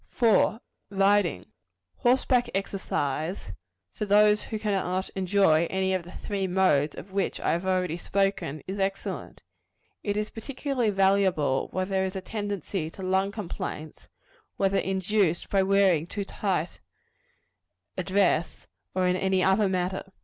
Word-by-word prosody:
4. 225 -1 +3 0.3
Riding. 195 - +2 0.5
Horseback 250 0 +2
exercise, 170 - -2 0.4
for 210 - -3
those 210 +1 +5
who 220 - -4
cannot 190 -3 -1
enjoy 185 -4 +2
any 190 0 0
of 185 - 0
the 175 +1 -12
three 195 -1 -3
modes 175 -6 +2
of 195 - -10
which 195 0 -1
I - - 0
have 170 +3 -1
already 180 -3 0
spoken, 195 -6 -1
is 195 +2 -5
excellent. 195 0 -3 0.6
It 205 0 -2
is 210 0 -2
particularly 260 0 -2
valuable 190 -8 +2
where 185 0 -1
there 190 0 0
is 190 +1 -3
a 190 - -3
tendency 200 -5 -4
to 190 - -10
lung 190 +1 +1
complaints, 170 -6 -6 0.5
whether 195 0 +2
induced 190 -2 0
by 195 - +4
wearing 190 -4 +3
too 200 +2 -4
tight 185 -5 -2 1.2
a - - -2
dress, 185 -3 +1 0.3
or 185 -1 +2
in 180 0 +2
any 190 0 +1
other 190 +1 +3
manner. 185 0 -1
190 Hz, 140 wpm, -27 LUFS, 180-200 Hz, 1.2 s, those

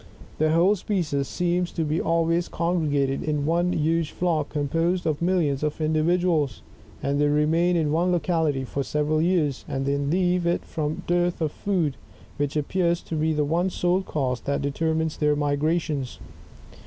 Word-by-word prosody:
The 155 0 +3
whole 175 +6 +4
species 165 -9 -1
seems 175 0 -1
to 165 - -1
be 155 +2 0
always 165 +1 +1
congregated 150 -6 0
in 150 -2 -1
one 170 +3 +1
huge 165 0 +1
flock, 165 -4 -1
composed 165 +5 0
of 155 -1 -1
millions 170 -6 +1
of 150 +1 -2
individuals; 155 -3 +1 0.4
and 140 +1 0
they 145 - +4
remain 160 +4 +2
in 155 -3 +1
one 170 +3 +2
locality 160 -6 0
for 140 +2 -3
several 150 +2 0
years, 160 -6 +1
and 135 0 -2
then 140 0 0
leave 180 0 +1
it 170 - 0
from 155 -1 -3
dearth 175 0 +1
of 155 -3 0
food, 170 -9 -1 0.4
which 145 +1 -1
appears 170 +3 0
to 165 - -5
be 155 +1 +1
the 160 +4 +1
sole 180 +1 +1
cause 130 -9 -2
that 140 0 -2
deter 160 +3 0
mifles 160 -1 -1
their 150 -1 +3
migrations. 145 -1 -1
160 Hz, 165 wpm, -25 LUFS, 145-175 Hz, 0.4 s, whole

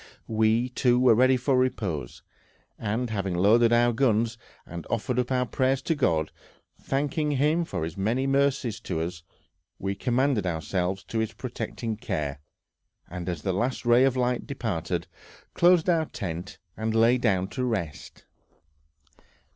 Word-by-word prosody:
We, 110 +2 +2
too, 125 -1 +2
were 125 -2 +6
ready 130 +3 +4
for 130 +2 +1
repose, 100 - -1 0.6
and 110 +3 -2
having 100 -4 -2
loaded 115 +6 +4
our 120 0 +4
guns, 115 -2 +1 0.3
and 85 0 -8
offered 125 +2 -1
up 125 +1 -1
our 125 -1 +2
prayers 130 +3 0
to 165 - +1
God, 80 - 0 0.5
thanking 145 +2 -1
Him 150 +5 +2
for 90 - -4
His 80 0 -4
many 115 +7 0
mercies 135 -4 +1
to 95 - -4
us, 85 +1 -4 0.6
we 95 +1 -2
commended 125 -1 0
ourselves 90 +3 -2
to 110 +5 -3
His 110 0 -2
protecting 115 -1 -5
care, 75 - -3 0.7
and 90 0 -5
as 85 -4 -4
the 95 - 0
last 120 +7 -2
ray 120 +2 +5
of 135 -1 +2
light 125 -1 0
departed, 110 - -3 0.5
closed 175 -1 +4
our 165 -3 +3
tent 90 -1 -6 0.2
and 110 0 -2
lay 115 +3 +4
down 95 -6 +1
to 130 - -3
rest. 95 - -4
115 Hz, 150 wpm, -26 LUFS, 95-130 Hz, 0.7 s, were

